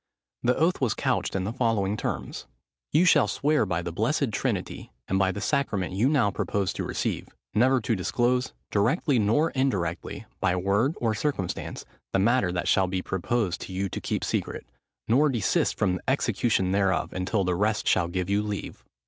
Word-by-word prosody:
The 125 +1 +2
oath 165 +1 +2
was 125 -5 +1
couched - - -1
in 95 - 0
the 105 +4 -3
following 115 -5 +1
terms:— 110 - -4 0.4
"You 160 +5 +4
shall 155 -5 +5
swear 150 -6 +1
by 85 -1 -1
the 85 - -4
blessed 85 - 0
Trinity, - - -3 0.2
and 95 - +1
by 95 -1 +3
the 95 - -5
sacrament 105 -9 0
you 110 +8 +2
now 130 -9 +3
purpose 100 -1 -1
to - - -4
receive, - - -3 0.2
never 130 +5 +4
to 115 - 0
disclose, 120 +6 0 0.2
directly 120 - +2
nor 115 +10 +2
indirectly, 100 -11 -2
by 90 -1 +1
word 100 - +1
or 115 -2 +1
circumstance, 110 - -3 0.3
the - - +3
matter 105 -1 +3
that 90 0 -2
shall 95 -1 +3
be 90 0 -2
proposed 95 0 -1
to 95 - -7
you 95 +1 -1
to - - -5
keep - - -2
secret, - - -2 0.4
nor 140 +7 +4
desist 115 -7 +1
from 90 -3 +1
the - - -13
execution 115 -7 +1
thereof 95 -2 +1
until 95 +2 0
the 90 0 0
rest 105 +4 0
shall 85 - +3
give 90 +1 -2
you 100 +1 +1
leave." 105 -1 -5
105 Hz, 180 wpm, -26 LUFS, 95-125 Hz, 0.4 s, shall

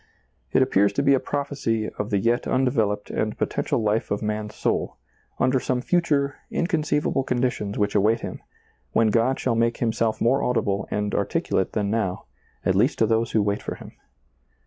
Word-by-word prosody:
It 130 - +4
appears 100 -6 +2
to 140 - 0
be 140 0 +5
a 135 - +4
prophecy 135 -7 -2
of 105 +1 -2
the 100 - +1
yet 115 +4 +1
undeveloped 115 -6 0
and 110 0 -2
potential 115 - -1
life 105 +1 0
of 100 - -2
man's 105 0 -3
soul, - - -1 0.4
under 130 0 +2
some 125 0 -1
future, 140 -2 +1
inconceivable 150 -4 0
conditions 125 -5 -1
which 105 0 +1
await 110 +3 +3
him, - - -6 0.5
when 115 -1 +4
God 115 +4 +2
shall 125 - 0
make 115 0 +1
himself 115 -1 0
more 130 +4 +2
audible 110 -5 0
and 105 0 -2
articulate 95 - 0
than 105 -2 0
now, 105 -5 -1 0.4
at 95 - +3
least 115 +10 +2
to 115 - +3
those 115 +1 0
who 110 - +3
wait 100 0 -1
for - - -5
Him. - - -11
115 Hz, 175 wpm, -24 LUFS, 105-130 Hz, 0.5 s, be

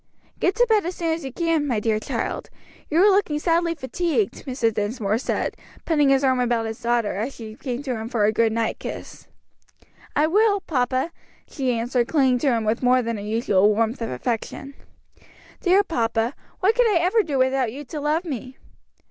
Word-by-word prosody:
"Get 365 - +1
to 485 - +4
bed 435 -2 +3
as 360 - -4
soon 330 -2 -1
as 325 -1 -4
you 265 - -5
can, 325 0 0
my 240 -5 0
dear 215 0 0
child; - - -4 0.4
you 315 - 0
are 400 +4 +6
looking 385 -6 +2
sadly 335 +1 +1
fatigued," 340 - -2
Mr. 245 -4 0
Dinsmore 210 0 -1
said, - - -2 0.3
putting 295 -4 +3
his 270 0 +3
arm 260 -1 +3
about 240 -2 +1
his 225 +1 -6
daughter 235 -2 +1
as 235 +7 -3
she 220 -2 -8
came 250 +3 -5
to 260 -4 -2
him 220 0 -5
for 235 -4 -1
her 205 +1 +4
good 225 0 +2
night 225 0 -1
kiss. - - -8 0.9
"I 300 - +4
will, 405 +5 +3
papa," 260 -1 -1 0.4
she 255 -4 -1
answered, 240 +1 0
clinging 265 -5 +3
to 285 - 0
him 230 -2 0
with 220 +2 0
more 255 0 +3
than 230 -1 -2
her - - -6
usual 210 -2 +2
warmth 225 +3 0
of 230 - -2
affection. 230 - -4 0.9
"Dear 380 +2 +4
papa, 230 - 0 0.3
what 400 +4 +4
could - - +3
I 375 - +3
ever 365 +7 +3
do 295 -9 -2
without 260 -2 +2
you 285 +4 -8
to 295 +3 -6
love 310 +4 0
me?" 260 -4 -6
260 Hz, 200 wpm, -23 LUFS, 230-325 Hz, 0.9 s, are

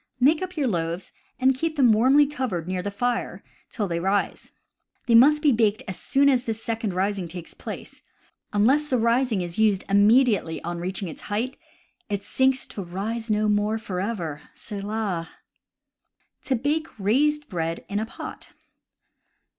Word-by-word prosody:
Make 300 +6 +4
up 365 -2 -5
your 290 - +1
loaves, 170 -2 -2 0.3
and 265 +1 +4
keep 315 +4 -2
them 260 -6 +5
warmly 260 +7 +5
covered 250 - -3
near 185 0 -2
the 205 - -3
fire 245 +4 -2 0.3
till 210 -5 -2
they 170 -1 -2
rise. 195 +3 -1 0.5
They 235 - +2
must 295 +6 +6
be 295 - +5
baked 215 -3 +2
as 190 - -5
soon 280 0 +2
as 255 -3 +3
this 225 -1 -4
second 225 -4 -2
rising 195 -1 -1
takes 170 0 -8
place; - - -8
for, - - -33 0.5
unless 260 +9 +3
the 255 - +1
rising 235 -2 +2
is 175 +2 -5
used 210 -3 +3
immedi 210 +3 +4
ately 160 -1 -6
on 175 0 -4
reaching 185 +2 -3
its 160 - -8
height, 235 +6 -1 0.5
it 200 -1 -2
sinks 260 0 +1
to 200 - -7
rise 210 +6 -4
no 215 0 +2
more 210 +1 +1
forever 185 -7 -4
— - - -33
selah! 200 -5 -3 1.2
To 265 - +1
Bake 295 +6 -1
Raised 295 +9 +2
Bread 165 -5 -3
in 205 - -2
a 220 - -3
Pot. - - -9
215 Hz, 170 wpm, -25 LUFS, 190-260 Hz, 1.2 s, must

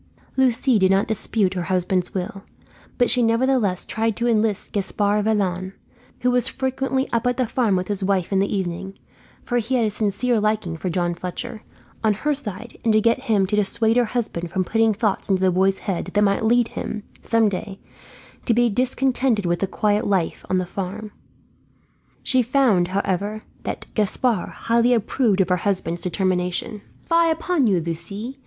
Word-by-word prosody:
Lucie 255 -2 +3
did 190 -1 +4
not 195 +1 +2
dispute 215 -3 +1
her 180 - -2
husband's 185 0 0
will; 190 +1 -4 0.6
but 245 - +3
she 250 - +4
nevertheless 230 -4 +1
tried 225 -1 -1
to 235 - -1
enlist 220 -3 0
Gaspard 205 +1 0
Vaillant 190 -3 0 0.5
who 250 - +2
was 245 -1 +2
frequently 265 0 -1
up 235 +1 +1
at 245 - 0
the 255 - +1
farm 225 -3 +1
with 180 0 -1
his 200 -2 -2
wife 190 -1 0
in 195 - +3
the 200 - 0
evening, 190 0 -3 0.5
for 245 -1 0
he 235 +3 -1
had 235 -3 +2
a 215 - 0
sincere 215 +3 0
liking 210 -5 0
for 180 +3 -4
John 175 0 0
Fletcher 180 +5 -6 0.4
on 215 -2 +3
her 300 +8 0
side; 225 -4 -7
and 230 - +3
to 215 - +5
get 230 +2 +1
him 205 -4 +2
to 205 +3 -1
dissuade 220 +2 +2
her 245 -1 +4
husband 215 -7 -3
from 185 +2 0
putting 225 +3 +2
thoughts 210 -2 -1
into 190 -1 +2
the 185 - +4
boy's 190 +2 +2
head 195 -4 -3
that 205 - +4
might 200 +1 +2
lead 235 +1 +3
him, 215 - -5 0.2
some 230 -1 +2
day, 195 0 -4 0.7
to 230 - +3
be 240 -1 +3
discontented 255 -2 +1
with 175 0 0
the 195 - 0
quiet 210 +2 0
life 190 -5 0
on 185 - +2
the 185 - 0
farm. 200 +4 -5 1.1
She 260 -1 +3
found, 240 -8 +3
however, 200 +3 -2 0.2
that - - -4
Gaspard 215 -1 0
highly 235 +1 +2
approved 220 -2 +1
of 190 - 0
her 180 - +3
husband's 175 -2 -1
determination. 185 +2 -1 0.2
"Fie 335 0 +3
upon 325 -4 +1
you, 190 -4 +3
Lucie. 200 +10 -5
210 Hz, 180 wpm, -22 LUFS, 190-235 Hz, 1.1 s, to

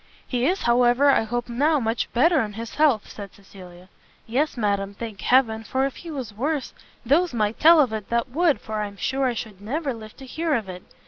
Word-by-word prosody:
"He 250 0 0
is, 370 +3 0
however, 245 +3 +4
I - - +3
hope 240 +2 -3
now 290 +6 +1
much 225 -1 -2
better 305 +5 +3
in 210 -2 -4
his 225 +2 -7
health?" 290 -8 +2
said 200 -3 -10
Cecilia. 185 -2 -14 0.4
"Yes, 265 +5 -1
madam, 200 -2 -1
thank 215 -3 -7
heaven, 225 -4 +2
for 260 +4 0
if 275 - -4
he 340 - -10
was 260 -8 -6
worse, 280 +5 -2 0.3
those 310 +4 +2
might 215 -1 -1
tell 330 +1 +7
of 260 -7 +3
it 215 -2 -5
that 235 +1 0
would, 315 +3 +2
for 215 -1 -4
I'm 200 -1 -6
sure 265 +7 -1
I 245 - -1
should 215 -4 -7
never 275 +6 -3
live 215 -2 -11
to 270 - -11
hear 315 +3 -1
of 220 -5 -2
it. 180 -1 -8
240 Hz, 215 wpm, -24 LUFS, 215-280 Hz, 0.4 s, tell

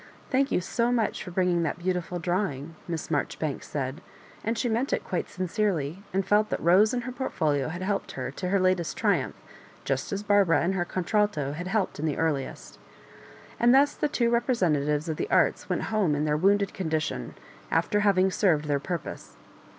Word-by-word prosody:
*' - - -26
Thank 270 +1 +2
you - - +2
so 235 +6 0
much 230 -3 0
for - - -8
bringing 180 -1 +1
that 165 - -1
beautifiol 180 0 -2
drawing," 165 -4 -2
Miss 165 -2 -4
Marjoribanks 150 0 -2
said; 140 +2 -3 0.4
and 225 +1 -1
she 245 - 0
meant 235 +4 0
it - - 0
quite 180 - -3
sincerely, 185 -3 -1
and 195 0 0
felt 210 +2 +3
that - - -1
Rose 190 +6 +5
and 245 -1 -2
her 255 - -5
portfolio 155 - -1
had 175 +3 -5
helped 200 +1 -2
her 130 -1 -4
to 180 +6 -4
l^er 195 +2 +2
latest 185 -3 +1
tri - - +2
umph - - -7 0.5
just 135 -1 -1
as 200 +1 -2
Barbara 200 -5 +4
and 180 +3 +1
her 175 -2 0
contralto 185 -5 0
had 175 +5 -5
helped 195 -4 -1
in 155 - -1
the 150 - -1
earliest 150 -5 -2 0.8
And 240 +2 +5
thus 280 +2 +5
the - - 0
two 235 -5 +1
repre 240 +2 +2
sentatives 150 -3 +1
of 160 -2 -2
the - - -3
arts - - +2
went - - 0
home 190 -9 +2
in 150 +1 0
their 150 -1 +1
wounded 200 +5 +2
condition, 155 - -2 0.3
after 170 +5 +1
having 190 -2 +3
served 170 -6 +2
their 145 -1 +1
purpose. 170 +3 -6
180 Hz, 195 wpm, -27 LUFS, 155-210 Hz, 0.8 s, Rose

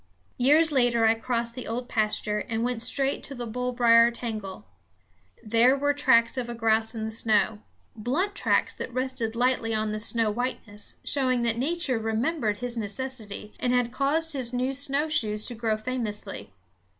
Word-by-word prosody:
Years 305 +6 +4
later 245 -4 +2
I 220 - +5
crossed 235 0 -3
the 250 0 -7
old 245 +2 -4
pasture 215 -2 +1
and 225 0 -1
went 245 -2 -1
straight 270 +3 +2
to 275 - -7
the 245 -1 -5
bullbrier 235 0 +3
tangle. 220 -5 -6 0.8
There 235 +5 +3
were 290 +1 +1
tracks 235 -4 +3
of 240 -1 -4
a 240 - -5
grouse 225 0 +1
in 220 - -4
the 220 - -4
snow, 220 -1 +1 0.4
blunt 285 - -1
tracks - - +1
that - - -6
rested 255 -3 -2
lightly 240 -2 +1
on 215 0 -1
the 215 - -3
soft 225 -1 +1
whiteness, 225 -4 -4
showing 255 -3 +2
that 230 0 0
Nature 290 -3 0
remembered 225 +1 -1
his 245 +2 -5
necessity 215 -1 -5
and 250 - 0
had 245 -1 +1
caused 315 +5 +1
his 255 -4 -1
new 255 +2 -1
snowshoes 275 -6 0
to 245 - -4
grow 225 -2 -1
famously. 215 - -5
235 Hz, 165 wpm, -26 LUFS, 220-260 Hz, 0.8 s, I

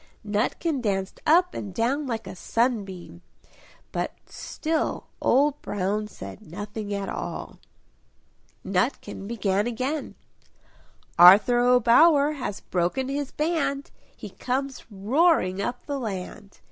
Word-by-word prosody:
Nutkin 250 +8 -1
danced 195 -4 -2
up 355 +4 +4
and 200 - -5
down 270 +7 0
like 230 -3 -3
a - - -8
sunbeam; 195 -5 -2 0.7
but - - -2
still 315 0 -3 0.2
Old 285 +3 +3
Brown 205 +2 -2
said 95 - -10
nothing 205 +2 -6
at 200 -1 -2
all. - - -6 1.1
Nutkin 195 +1 -2
began 205 -2 0
again 260 +6 -3 1.0
"Arthur 205 +8 +8
O'Bower 250 +5 +5
has 260 -9 -5
broken 185 +10 -1
his 280 0 -2
band, 305 -2 -1 0.3
He - - -9
comes 265 +1 -3
roaring 210 - +2
up 245 +4 -4
the 285 -1 -3
land! 200 -2 -6
235 Hz, 110 wpm, -25 LUFS, 200-280 Hz, 1.1 s, Arthur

